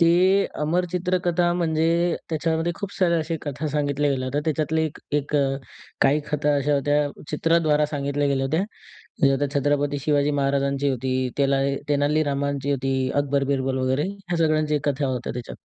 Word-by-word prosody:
ते 170 0 +6 0.5
अमर 170 +4 +1
चित्रकथा, 175 -1 +1
म्हणजे 160 -2 +1 0.4
त्याच्यामध्ये 165 +1 0
खूप 200 +1 -6
साऱ्या 170 -3 +2
अशा 160 +1 -2
कथा 145 +1 -4
सांगितल्या 145 0 0
गेल्या 130 -1 -1
होत्या. 140 +3 -1
त्याच्यातले 160 0 0
एक 155 - -9 0.2
एक 145 +1 -5
अ, - - +4 0.6
काही 145 +3 +4
कथा 150 0 +1
अशा 145 +1 +1
होत्या, 145 +1 +2 0.3
चित्राद्वारा 155 -1 +2
सांगितल्या 145 -1 -1
गेल्या 135 -1 +1
होत्या. 160 +6 +1 0.8
त्या 145 +1 0
छत्रपती 145 0 +1
शिवाजी 145 0 +2
महाराजांची 140 0 +1
होती, 130 0 -2 0.2
तेला 135 -1 +2 0.3
तेनालीरामांची 145 -1 0
होती. 135 -1 0
अकबर 140 -1 +1
बिरबल 130 -1 -1
वगैरे 130 +2 +1
ह्या 190 -3 -5
सगळ्यांच्या 155 -2 +2
कथा 140 +1 -1
होत्या 125 -2 -3
त्याच्यात. 120 -1 -7
145 Hz, 155 wpm, -24 LUFS, 140-160 Hz, 0.8 s, ते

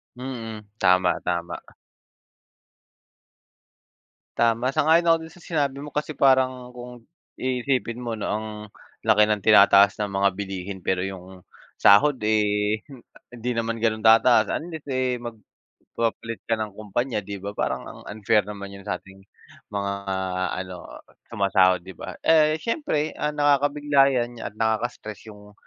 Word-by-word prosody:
Mm, 120 -4 -6 0.2
tama, 90 -1 +3
tama. 85 -1 -4 2.6
Tama, 120 +3 +2
sang-ayon 165 +4 +3
ako 165 -1 +5
dun 160 0 -11
sa - - -18
sinabi 145 -6 -2
mo 145 +1 -8
kasi 150 -1 -3
parang 130 -2 +2
kung 125 -1 -11 0.3
iisipin 125 -2 -1
mo 115 -2 -4
'no 105 - -4
ang 110 +1 -2 0.6
laki 105 0 +5
ng 105 -2 -1
tinataas 100 -1 +6
ng 105 - -1
mga 100 0 +2
bilihin 95 0 -6
pero 90 +1 -1
'yung 95 -1 -9 0.3
sahod, 130 +7 +5
eh, 105 0 +1 0.5
hindi 120 0 -4
naman 115 0 -2
gano'n 110 -1 0
tataas 115 +3 +5
unless, 160 -2 -4
eh, 130 -2 -1
magpapalit 115 0 -6
ka 115 - +2
ng 110 -2 -4
kumpanya, 110 +3 -3
'di 100 +1 -7
ba. 100 - -4
Parang - - -2
ang - - -11
unfair 105 +1 +2
naman 100 -1 -8
'yun 100 - -10
sa 90 - -1
ating 95 +1 -17 0.5
mga 100 -1 -2 0.7
ano 90 -1 -8 0.5
sumasahod, 95 -2 +2
'di 95 - -9
ba. - - -9
Eh, 155 -1 +4
siyempre 160 - -2
ang 150 0 -3
nakakabigla 145 -1 +3
'yan 120 -1 -3
at 110 - -7
nakaka-stress 110 -1 -3
'yung 105 -1 -14
115 Hz, 140 wpm, -24 LUFS, 100-130 Hz, 2.6 s, tinataas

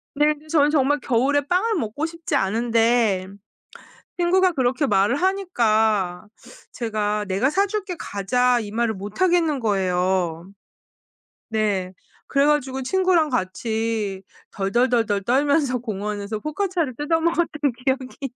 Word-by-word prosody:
네. 295 - +3
그래서 300 +1 -18
저는 290 +1 +4
정말 290 -1 +2
겨울에 265 +3 +1
빵을 370 +9 0
먹고 290 - -2
싶지 330 0 -4
않은데 225 -2 +1 0.9
친구가 365 +1 +3
그렇게 265 +1 0
말을 205 +5 +2
하니까 220 - +1 0.5
제가 210 -3 -2
"내가 195 +8 +1
사 390 +6 +2
줄게 400 -3 -4
가자." 245 +5 +1
이 205 -2 -7
말을 230 0 0
못 205 - -8
하겠는 340 -5 +2
거예요. 185 -4 0 1.0
네. 205 -4 -1 0.3
그래 280 0 +2
가지고 265 -3 0
친구랑 360 0 +2
같이 220 -2 -2 0.3
덜덜덜덜 220 0 +1
떨면서 275 +2 +2
공원에서 210 -1 -4
포카치아를 320 - -2
뜯어먹었던 330 +4 +1 0.4
기억이. 265 0 -2
245 Hz, 280 characters per minute, -22 LUFS, 210-300 Hz, 1.0 s, 저는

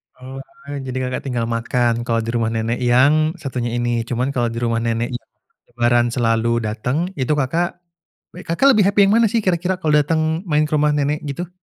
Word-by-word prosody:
Oh 130 +1 -9 0.2
wah, 140 +1 -7
jadi 130 -1 -5
Kakak 125 0 -3
tinggal 120 -3 -1
makan 115 +1 0
kalau 115 -1 0
di 115 - -5
rumah 115 -1 0
nenek 115 +1 -2
yang 145 +7 +3
satunya 125 -6 -4
ini, 120 -1 0
cuman 125 +3 -1
kalau 120 -2 0
di 115 - -7
rumah 115 -1 0
nenek 115 +2 -1
yang 120 - -7 0.5
Lebaran 120 0 +2
selalu 115 0 0
datang, 125 - -2
itu 130 +3 +1
Kakak 165 +6 -1 0.6
w 180 - -9
Kakak 270 +12 +3
lebih 210 -3 +3
happy 200 0 +3
yang 200 - +3
mana 230 0 +4
sih, 230 - +2
kira-kira 185 0 0
kalau 155 -3 +1
datang 160 +3 0
main 150 -2 +2
ke - - -16
rumah 150 0 +2
nenek 145 +1 0
gitu? 160 +6 -4
130 Hz, 200 wpm, -20 LUFS, 120-155 Hz, 0.6 s, mana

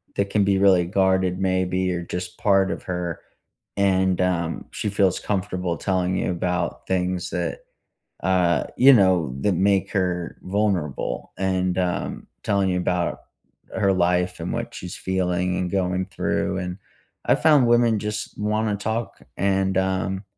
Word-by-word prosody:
that 100 0 0
can 100 -1 +2
be 100 -1 +2
really 95 -3 +4
guarded 95 -1 +1
maybe, 95 0 0
or 85 - -3
just 90 +1 -6
part 95 -2 +3
of - - -5
her, 90 -2 -3 0.6
and, 95 -2 +2
um, 85 -3 -1
she 105 - -3
feels 100 -2 +2
comfortable 90 -3 -2
telling 95 -1 0
you 90 - 0
about 90 0 -2
things 90 -1 -1
that, 85 -2 -2 0.6
uh, 90 -2 +2
you 135 +2 +8
know, 90 - +3
that 100 - +2
make 95 +2 +2
her 90 -3 -1
vulnerable, 95 -7 -1
and, 95 -1 0
um, 90 -1 -2 0.2
telling 100 -3 +1
you 90 - 0
about 90 -1 -1 0.5
her 100 - +2
life 90 0 +1
and - - -4
what - - -4
she's 90 0 -7
feeling 90 -1 -1
and 90 -1 -1
going 95 -1 0
through, 95 -1 -1
and 90 -1 -4 0.5
I - - +4
found 150 -6 +4
women 120 -2 +3
just 105 +1 -4
wanna 105 0 0
talk, 110 +3 -3 0.2
and, 95 0 +1
um, 95 0 -1
95 Hz, 150 wpm, -23 LUFS, 90-100 Hz, 0.6 s, you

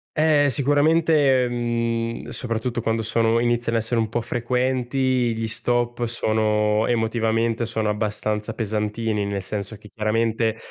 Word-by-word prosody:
Eh, 155 -2 +3
sicuramente, 145 -1 +3
mhmm, 115 -1 -2
soprattutto 120 0 -1
quando 115 0 -1
sono 115 +1 +2
iniziano 120 -1 0
a - - +2
essere 115 +1 0
un 110 - -2
po' 120 +2 -1
frequenti 125 +1 0
gli 115 - -2
stop, 120 +1 0
sono 110 -1 +1
emotivamente 115 0 0
sono 110 -1 -2
abbastanza 105 +1 -2
pesantini. 105 -1 -2
Nel 100 -1 -3
senso 105 +1 -5
che 105 +1 -15
chiaramente 110 +1 0
115 Hz, 130 wpm, -23 LUFS, 110-120 Hz, -, Eh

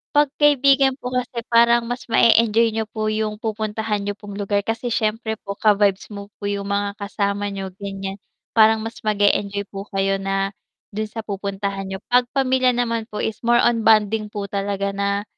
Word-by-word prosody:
'pag 295 0 +5
kaibigan 275 -2 +4
po 250 - -5
kasi 245 -2 -2
parang 235 0 +4
mas 245 0 -4
ma-e-enjoy 230 0 +4
niyo 225 - 0
po 215 -1 -2
'yong 215 0 -2
pupuntahan 215 -1 -2
niyo 205 0 -3
pong 205 -1 -9
lugar 200 0 -1
kasi 230 +2 -2
syempre 220 0 -1
po 200 0 -5
ka-vibes 205 -2 +2
mo 200 -1 -7
po - - -15
'yong 200 0 -3
mga 200 0 0
kasama 200 0 -2
niyo, 195 -1 -5
ganiyan. 195 0 -5 0.3
Parang 220 -1 +4
mas 225 +1 -7
mag-e-enjoy 205 -1 +1
po 195 +1 -7
kayo 195 0 +2
na 195 0 -1 0.4
do'n 215 +1 -3
sa 225 +1 -7
pupuntahan 200 -1 -4
niyo. 190 0 -5
'Pag 245 0 +4
pamilya 260 -2 +2
naman 230 -2 -1
po 210 - -6
is 220 - -3
more 240 0 +4
on 230 -2 +2
bonding 215 -1 +3
po 200 -1 -4
talaga 200 0 -2
na 200 0 -1
215 Hz, 180 wpm, -21 LUFS, 200-230 Hz, 0.4 s, pag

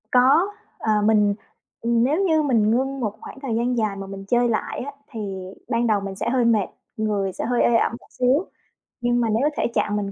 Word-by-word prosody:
Có, 265 +9 +5 0.3
ờ, 220 - -1
mình, 210 -1 +4 0.5
ừm, 235 0 +2
nếu 300 +9 +2
như 320 -4 +3
mình 230 -7 +2
ngưng 270 +3 0
một 215 -5 -1
khoảng - - -10
thời 265 -5 -2
gian 240 +2 0
dài 215 -3 0
mà 195 0 -7
mình 195 0 -8
chơi 240 +2 +3
lại 220 - -2
á 285 - -5 0.2
thì 230 - -6 0.5
ban 235 -1 +1
đầu 215 -2 +3
mình 195 -1 -5
sẽ 220 - -2
hơi 245 -1 +2
mệt, 220 -4 +3 0.3
người 205 -3 -1
sẽ - - -4
hơi 245 +1 +1
ê 240 - +4
ẩm - - +3
một - - -21
xíu. 260 +8 +3 0.6
Nhưng 240 0 +2
mà 230 - +1
nếu 230 +7 +2
thể - - +1
trạng 210 - +1
mình 200 -1 -2
235 Hz, 225 wpm, -23 LUFS, 210-255 Hz, 0.6 s, Có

